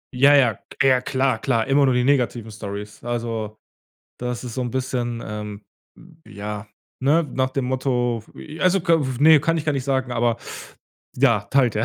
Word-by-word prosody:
Ja, 140 +3 +6
ja, 125 -7 +4 0.3
ja, 130 -2 +4
klar, 130 -3 0
klar, 115 -3 0
immer 140 +1 +4
nur 130 - +3
die 125 - +2
negativen 125 -4 0
Storys, 105 0 -8
also 115 -3 -3 0.6
das 125 -1 -4
ist 120 -2 -6
so 130 - -2
'n 120 - -3
bisschen, 125 -2 -2
ähm, 105 -1 -7 0.6
ja, 105 0 -6 0.3
ne, 145 +6 +3
nach 130 -3 -2
dem 135 -2 -2
Motto 125 -3 -1 0.4
also 185 +1 +3
k 165 0 +3 0.2
ne, 155 +1 +8
kann 165 +3 +1
ich 155 - -4
gar 155 - +1
nicht 135 -3 -2
sagen, 130 -2 -1
aber 120 -1 +1 0.8
ja, 125 -4 +4
teilt 125 -5 +3
er. 110 - +1
125 Hz, 170 wpm, -22 LUFS, 115-135 Hz, 0.8 s, ne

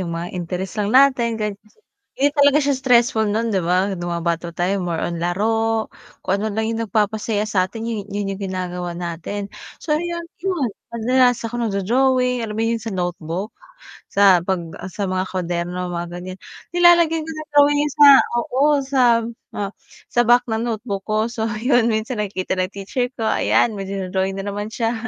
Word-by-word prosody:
yung 180 - -3
mga 170 +1 -5
interest 180 +3 -4
lang 205 - 0
natin 255 -2 +4
gan 210 -1 -2 0.6
hindi 280 - +3
talaga 285 0 +5
siya 285 - +2
stressful 240 -3 +3
nun 230 +2 0
di 190 - +1
ba? 185 +3 +1
Nung 175 0 -5
mga 170 0 -3
bata 170 0 -1
pa - - -31
tayo 195 +2 +1
more 170 -2 -2
on 170 - -2
laro, 220 +5 0 0.3
kung 190 - 0
ano 215 - -1
lang 220 +1 -1
yung 230 0 -2
nagpapasaya 210 0 0
satin 210 +3 -1
yun, 215 -3 -3
yun 205 0 -2
yung 195 - -10
ginagawa 180 -2 -4
natin. 175 +4 -5 0.3
So 300 -2 0
yun 340 +1 -3 0.2
yun 350 -10 0 0.2
madalas 245 +1 +2
ako 230 +1 -4
nagdo-drawing 250 +5 +1
alam 215 - -5
mo 225 - 0
yun 230 0 0
sa 225 -1 -5
notebook? 175 +2 -3 0.6
Sa 200 -2 +6
pag 190 -2 +1 0.3
sa 200 +2 -3
mga 185 0 0
kuwaderno 180 0 -2
mga 170 0 -3
ganyan, 185 +1 -8 0.4
nilalagay 345 -2 +5
ko - - -6
na 310 0 -7
drawing, 290 0 +4
sa 295 -1 +7 0.3
oo, 250 +3 -1 0.2
sa, 270 -1 0 0.6
ah, 200 -1 -2 0.4
sa 240 - +3
back 245 +1 +5
ng 220 0 -1
notebook 215 -3 -3
ko. 215 +1 +1
So 225 -2 -2
yun 245 0 +3
minsan 220 +2 -2
nakita 190 -2 -3
ng 185 0 0
teacher 200 +6 -2
ko 225 - -1
ayan 225 - +2
may 195 - -5 0.3
drawing 190 0 0
na 195 - -5
naman 205 +1 -4
siya 230 0 0
215 Hz, 180 wpm, -21 LUFS, 185-245 Hz, 0.6 s, sa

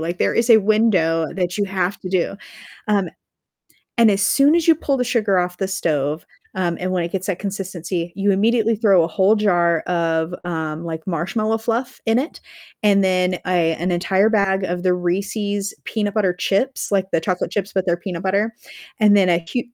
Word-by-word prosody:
like, 170 +2 -4
there - - +1
is 230 +1 +1
a 225 - +9
window 190 -7 +2
that 180 -1 -2
you 205 - 0
have 190 0 -2
to 185 - -6
do. 185 +1 -1 0.5
Um, 200 -4 +1 0.9
and 230 -2 +5
as 195 0 +1
soon 280 +9 +4
as 335 - 0
you 330 - +6
pull 280 -2 -1
the 250 - 0
sugar 220 -6 +1
off 180 0 -2
the 190 -1 -2
stove, 155 -5 -2 0.3
um, 175 -2 -1
and 185 +1 -2
when 180 -2 0
it 170 - -6
gets 190 +1 -3
that 185 - -1
consistency, 185 -3 -4
you 200 0 +2
immediately 225 +3 +2
throw 200 -6 +4
a - - -2
whole 200 +3 +3
jar 175 -5 +2
of, 165 -1 -1
um, 160 -1 -4
like, 160 0 -6
marshmallow 215 +6 -1
fluff 240 +3 -3
in 225 +2 +3
it, 290 +5 -4 0.4
and 200 -2 +4
then 185 -1 +1
a 170 -3 +2
an 180 +3 -2
entire 190 +4 +2
bag 195 -3 +1
of 175 0 -3
the 185 -1 +2
Reese's 195 +3 -2
peanut 205 -2 -2
butter 195 -5 +1
chips, 205 +9 -1
like 195 -1 +1
the 165 - +2
chocolate 180 0 -2
chips, 200 0 -3
but 190 -1 -1
they're 175 -1 +2
peanut 175 0 -6
butter, 200 +4 0 0.5
and 210 -1 +5
then 190 -2 +4
a 170 -1 +1
hu 245 - +2
190 Hz, 200 wpm, -20 LUFS, 175-210 Hz, 0.9 s, a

